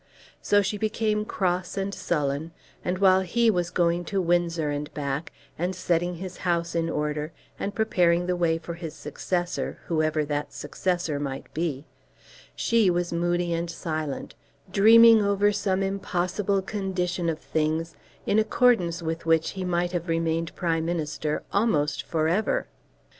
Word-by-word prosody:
So 205 0 +3
she 200 +2 -2
became 215 0 0
cross 180 -2 -1
and 195 0 -2
sullen; 150 -1 -2 0.3
and 180 +1 -1
while 190 -1 +5
he 225 +5 +2
was 175 -3 -1
going 175 -1 +1
to 195 +3 -1
Windsor 170 -3 +1
and 145 0 -4
back 140 +1 -3 0.3
and 180 +2 -1
setting 175 0 0
his 185 +1 -7
house 170 -2 -1
in 165 -1 0
order, 150 0 -2 0.3
and 200 - -3
preparing 175 -6 +2
the 180 0 0
way 170 -2 +1
for 170 +1 -7
his 165 -2 -7
successor, 175 +4 -3
whoever 155 -2 +1
that 145 0 -3
successor 170 -1 -2
might 135 -2 -5
be, 155 -3 -2 0.7
she 230 -4 +3
was 175 -1 0
moody 175 0 0
and 170 +1 -2
silent, 155 -4 -4 0.4
dreaming 225 +3 +8
over 200 +1 +3
some 195 -2 0
impossible 195 0 -1
condition 185 -4 -2
of 160 - -1
things 160 +2 -1 0.3
in 210 - +3
accordance 215 -7 +2
with 165 0 -3
which 165 0 +3
he 190 - -5
might 175 -1 0
have 175 -1 -3
remained 165 0 -1
Prime 165 -3 0
Minister 155 -2 -2
almost 150 -9 +1
for 160 -2 +1
ever. 190 +7 +1
175 Hz, 150 wpm, -26 LUFS, 160-190 Hz, 0.7 s, dreaming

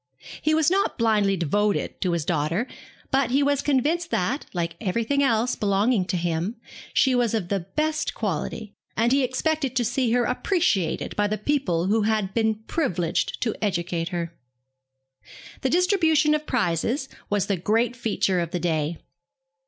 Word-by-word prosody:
He 310 0 +2
was 320 +1 +3
not 395 +1 +1
blindly 210 -4 +2
devoted 205 +5 0
to 180 -2 +1
his 165 -3 -1
daughter, 165 +6 0 0.5
but 270 -2 +2
he 275 +3 +3
was 285 0 +2
convinced 300 +5 +1
that, 255 - -1
like 170 -2 -2
every 225 +2 0
thing 280 +5 +1
else 240 -2 +2
belonging 205 +1 +2
to 185 -1 -1
him, 170 +5 -1 0.4
she 265 - +3
was 240 -3 +2
of 185 -6 -2
the 200 - +1 0.2
best 310 0 0
quality; 205 +1 -3 0.2
and 230 +2 +3
he 275 +1 +4
expected 270 +1 -1
to 245 -2 +2
see 245 +1 0
her 245 0 +3
appreciated 250 - 0
by 205 0 +2
the 215 +1 -1
people 210 - 0
who 215 +3 +2
had 210 -2 0
been 220 -1 0
privileged 185 - -1
to 225 - 0
educate 170 -3 -1
her. 170 -2 -4 1.3
The 265 - +1
distribution 325 -3 +3
of 305 0 -1
prizes 230 - 0 0.2
was 205 -2 +1
the 200 - 0
great 225 +7 +1
feature 210 -6 0
of 170 -2 -2
the 175 - -2
day. 160 -1 -1
220 Hz, 165 wpm, -24 LUFS, 180-270 Hz, 1.3 s, he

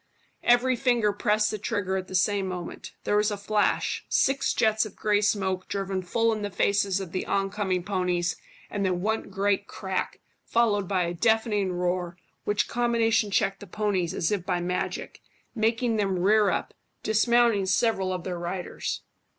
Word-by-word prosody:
Every 245 +2 +4
finger 240 -4 +2
pressed 210 +1 +1
the 215 - -4
trigger 200 -3 -1
at 185 -1 -3
the 185 - -6
same 195 +1 +2
moment; 180 -2 -6
there 205 - +1
was 210 +1 +3
a 205 - -3
flash, 205 +1 0
six 275 +1 +2
jets 220 0 +2
of 215 -3 -8
grey 210 -1 +1
smoke 190 -3 0
driven 195 -1 -2
full 225 +5 +1
in 215 - -4
the 205 - -2
faces 200 0 +1
of 190 -4 -6
the 185 - -2
on 195 0 0
coming 185 -3 -1
ponies, 180 -3 0 0.4
and 205 - -2
then 180 -2 0
one 220 +2 -1
great 200 +1 0
crack, 190 -2 -3 0.2
followed 210 -4 +1
by 185 -2 +1
a 170 0 -2
deafening 215 0 +1
roar, 180 0 -2 0.3
which 205 0 +1
combination 230 -2 +1
checked 195 0 +1
the 205 - -10
ponies 195 -5 -1
as 165 - 0
if 200 -4 0
by 175 - -1
magic, 180 +1 -3 0.3
making 225 0 +1
them 195 -3 0
rear 205 +3 +4
up, - - -2 0.3
dismounting 220 -2 +3
several 195 -1 +1
of 180 -2 -3
their 180 -1 -4
riders. 175 +1 -4
200 Hz, 175 wpm, -26 LUFS, 185-220 Hz, 0.4 s, Every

